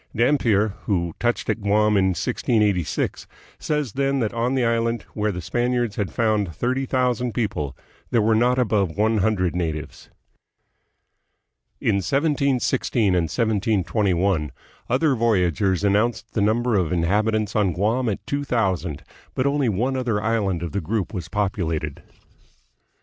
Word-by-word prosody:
Dampier, 115 -4 +3 0.2
who 85 -5 0
touched 120 0 0
at 110 - -1
Guam 105 +1 +2
in 95 -1 +3
1686, 100 - 0 0.3
says 150 -8 -2
then 140 0 0
that 115 -3 -1
on 120 +3 0
the 130 -2 +2
island, 115 0 0
where 105 0 0
the 90 -2 -6
Spaniards 120 +3 0
had 100 -3 -2
found 105 -7 0
thirty 130 +2 -1
thousand 125 -3 0
people, 75 - -2 0.3
there 120 - +2
were 110 +1 +3
not 120 +3 +3
above 100 -8 +1
one 110 +1 +2
hundred 95 -4 +1
natives. 80 -4 -4 1.7
In 100 - +1
1716 135 - +1
and 90 -2 +2
1721 100 - 0 0.4
other 140 +4 +2
voyagers 100 -5 +1
announced 105 +3 +1
the 105 - 0
number 115 +4 +1
of 90 -5 +1
inhabitants 105 +5 +1
on 105 -4 +2
Guam 110 +8 0
at 100 - -4
two 145 0 -2
thousand, 95 - -1 0.3
but 130 - 0
only 140 -3 +1
one 120 +7 0
other 120 -5 0
island 100 -5 0
of 85 - -4
the 100 - -2
group 105 +5 -2
was 85 -4 -5
populated. 85 -7 -2
110 Hz, 140 wpm, -23 LUFS, 95-120 Hz, 1.7 s, Dampier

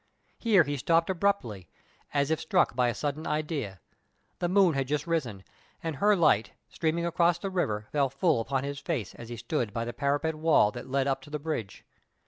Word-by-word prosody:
Here 210 -7 +5
he 145 0 -3
stopped 165 +6 +2
abruptly, 165 - -1 0.4
as 140 +1 +1
if 160 - +1
struck 175 -6 +2
by 125 -1 +3
a 120 - -3
sudden 150 +1 -3
idea. 150 - -2 0.6
The 175 - 0
moon 190 -2 +4
had 135 -1 -1
just 150 +1 -1
risen, 130 - -2 0.4
and 160 -4 -3
her 210 +4 +4
light, 130 - +3 0.2
streaming 170 +1 -1
across 170 0 +2
the 195 - -4
river, 110 - -1
fell 140 -2 +2
full 140 -1 +1
upon 135 +3 -1
his 140 0 -4
face 135 - -3
as 115 - -10
he 120 - -6
stood 120 -2 -2
by 115 +1 -2
the 120 - -5
parapet 145 +3 0
wall 155 -9 +3
that 125 - -8
led 135 0 +1
up 135 -1 0
to 145 - -13
the 150 - -3
bridge. 145 -9 -5
145 Hz, 200 wpm, -28 LUFS, 125-165 Hz, 0.6 s, Here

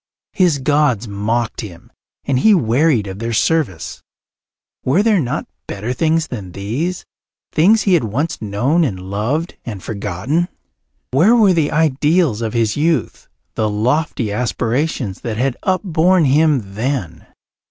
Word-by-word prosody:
His 175 -6 +3
gods 135 -5 +1
mocked 105 +3 -2
him 90 -6 -11 0.3
and 135 -2 +1
he 215 +8 +5
wearied 130 - +2
of 95 0 -7
their 115 +1 -3
service. 125 - -1 0.8
Were 165 +11 +2
there 215 -3 +3
not 125 -6 -2 0.2
better 105 +5 -4
things 160 +3 +1
than 100 -8 -7
these, 130 - -3 0.5
things 210 +8 +4
he 195 - +2
had 165 -9 +3
once 140 +10 -2
known 120 +11 +1
and 105 -11 -2
loved 110 - -3
and 105 -6 -7
forgotten? 110 - -2 0.6
Where 175 - +5
were 210 -5 +5
the 160 -4 +1
ideals 150 -3 +2
of 110 -2 -2
his 115 -2 +1
youth, 160 +2 -1 0.3
the 110 -1 0
lofty 120 +2 0
aspirations 125 - -2
that 115 -3 -4
had 130 +1 0
upborne 185 -2 +2
him 140 -7 +2
then? 110 - -3
130 Hz, 140 wpm, -18 LUFS, 110-160 Hz, 0.8 s, he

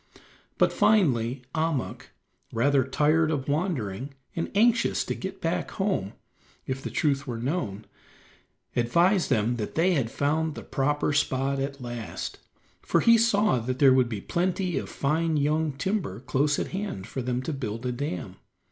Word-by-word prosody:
But - - +3
finally 130 - +2
Ahmuk, 160 -4 -2 0.4
rather 135 +3 +3
tired 150 +4 +2
of 145 -4 -2
wandering, 140 - -2 0.2
and 165 - -2
anxious 230 +3 +3
to - - -2
get - - -6
back - - -1
home, 190 - -1 0.5
if 130 0 -3
the - - -4
truth 140 -2 0
were 120 -2 -3
known, 115 - -3 0.9
advised 170 - +3
them 120 -1 +1
that 105 -3 -4
they 175 +4 +3
had 135 -8 0
found 155 +4 0
the - - -7
proper 145 +2 0
spot 135 -1 +1
at 135 -1 -4
last, 120 -2 -5 0.4
for - - +2
he 230 0 +7
saw 215 - +3
that 125 +2 -3
there 135 -1 +6
would 130 -2 +3
be 105 -4 -4
plenty 180 - -1
of - - -7
fine 160 +3 0
young 150 +2 +1
timber 190 - -2
close 140 +3 +1
at - - -2
hand 190 - -4
for 130 - -4
them 125 +1 -2
to 160 - -3
build 115 -3 -4
a 125 - 0
dam. 120 - -4
140 Hz, 160 wpm, -27 LUFS, 125-165 Hz, 0.9 s, he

